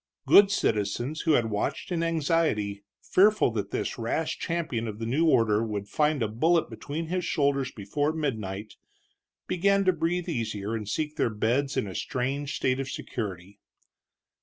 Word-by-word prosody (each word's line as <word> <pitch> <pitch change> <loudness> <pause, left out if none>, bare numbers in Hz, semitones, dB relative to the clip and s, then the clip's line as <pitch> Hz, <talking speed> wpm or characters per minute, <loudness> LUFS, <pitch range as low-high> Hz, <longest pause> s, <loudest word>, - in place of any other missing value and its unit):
Good 200 0 +7
citizens 120 - 0
who 160 - +2
had 115 -5 +2
watched 105 - -2
in 170 -2 0
anxiety, 155 - 0 0.2
fearful 210 - +4
that 105 -3 -3
this - - -3
rash 135 +8 -2
champion 160 -9 -2
of 105 -1 -5
the 115 - -4
new 145 +8 +2
order 115 -6 +3
would 105 -3 -4
find 150 +1 +1
a - - +1
bullet 160 +10 +1
between 155 +3 -5
his 180 +2 -2
shoulders 140 -4 +1
before 145 +9 -1
midnight, 110 -10 -4 0.7
began 195 +2 +2
to 185 - +4
breathe 170 +2 -1
easier 110 - -3
and 105 -3 -4
seek 155 +3 -2
their - - +2
beds 120 +6 0
in - - +1
a 95 - -6
strange 135 +7 -2
state 130 0 0
of 135 -1 -3
security. 100 -5 -6
135 Hz, 160 wpm, -27 LUFS, 110-160 Hz, 0.7 s, Good